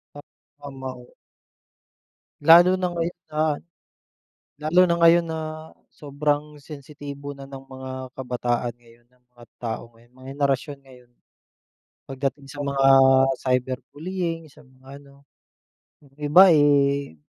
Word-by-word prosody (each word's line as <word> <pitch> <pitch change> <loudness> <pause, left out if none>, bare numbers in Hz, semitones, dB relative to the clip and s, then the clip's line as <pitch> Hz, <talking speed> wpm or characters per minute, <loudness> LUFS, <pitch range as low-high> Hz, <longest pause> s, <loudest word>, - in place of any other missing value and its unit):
Pa - - -9 0.4
tama 135 -2 -8
iyon. 125 - -19 1.3
Lalo 170 +4 +7
na 180 - 0
ngayon 170 0 -4
na 155 0 -5 1.2
lalo 160 +4 +3
na 170 -1 +1
ngayon 170 0 +5
na 160 -1 -4 0.5
sobrang 150 +1 -3
sensitibo 145 -1 -9
na 140 -1 -11
ng 135 -1 -10
mga 130 0 -9 0.3
kabataan 125 -2 -2
ngayon, 120 0 -23
ng 125 0 -35
mga 120 0 -15
tao 115 -2 -4
ngayon, 120 +1 -24
mga 130 +1 -15
henerasyon 140 0 -1
ngayon. 125 -2 -19 1.0
Pagdating 135 +1 -4
sa 145 - -9
mga 140 -1 0 0.5
cyber 130 0 -1 0.2
bullying, 165 0 -4
sa 145 - -19
mga 130 +2 -15
ano. 140 0 -20 0.8
Yung 140 -1 -24
iba 155 +6 +6
eh, 140 - +2
140 Hz, 125 wpm, -23 LUFS, 130-150 Hz, 1.3 s, Lalo